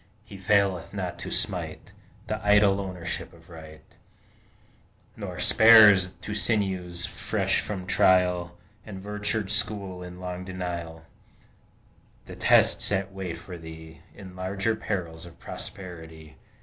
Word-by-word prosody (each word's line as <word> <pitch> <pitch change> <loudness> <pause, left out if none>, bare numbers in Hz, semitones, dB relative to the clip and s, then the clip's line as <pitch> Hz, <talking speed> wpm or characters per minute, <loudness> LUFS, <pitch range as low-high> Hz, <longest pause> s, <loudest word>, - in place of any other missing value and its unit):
He 105 - -12
faileth 95 -1 +1
not - - -4
to - - -6
smite - - -2 0.3
The 110 0 -4
idle 105 -1 +4
ownership 90 -3 -5
of - - -18
Right, 80 -1 -12 1.3
Nor - - -7
spares 105 -5 +7
to 105 - -5
sinews 95 -5 0
fresh - - -1
from 95 -3 -5
trial, 90 -2 +2 0.3
And 100 -3 -9
virtue 105 +1 -2
schooled 100 -3 -1
in 90 0 -10
long 90 0 -6
denial, 85 -3 -6 1.2
The - - -10
tests - - +3
that 95 -1 -2
wait 95 -3 -5
for 90 0 -10
thee 80 -1 -11 0.2
In 95 -3 -11
larger 95 +4 -1
perils 85 -6 -5
of 85 - -15
prosperity. 80 -4 -9
95 Hz, 125 wpm, -26 LUFS, 85-100 Hz, 1.3 s, spares